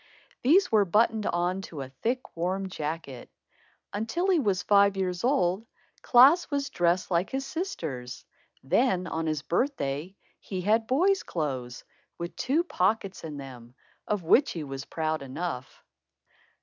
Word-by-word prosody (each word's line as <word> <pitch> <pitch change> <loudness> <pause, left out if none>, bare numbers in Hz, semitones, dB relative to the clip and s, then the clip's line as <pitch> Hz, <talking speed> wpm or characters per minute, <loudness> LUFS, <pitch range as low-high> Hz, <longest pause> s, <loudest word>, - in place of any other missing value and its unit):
These 350 +10 +4
were 215 -2 +5
buttoned 215 +3 +2
on 175 +2 0
to 150 -4 -7
a 130 - -9
thick 250 +3 -2
warm 190 +3 -2
jacket. 150 -6 -5 0.6
Until 335 - 0
he 355 - +4
was 200 -8 0
five 200 -1 +4
years 180 -2 -2
old, 215 -5 +1 0.3
Klaas 275 +8 +6
was 280 -1 -2
dressed 175 +2 +1
like 175 +2 +1
his 270 0 -3
sisters. 160 - -5 0.4
Then, 185 - +2
on 160 -2 -3
his 155 -1 -1
birthday, 175 - -1 0.2
he 185 -2 -5
had 220 +4 +2
boy's 375 +9 +3
clothes, 130 -6 -4 0.3
with 170 0 -6
two 295 +7 +1
pockets 195 - -1
in 155 -3 -6
them, 125 -3 -10 0.3
of 210 -4 -1
which 255 - +4
he 165 - -4
was 135 -1 -6
proud 160 -1 -2
enough. 135 0 -6
185 Hz, 145 wpm, -28 LUFS, 155-240 Hz, 0.6 s, Klaas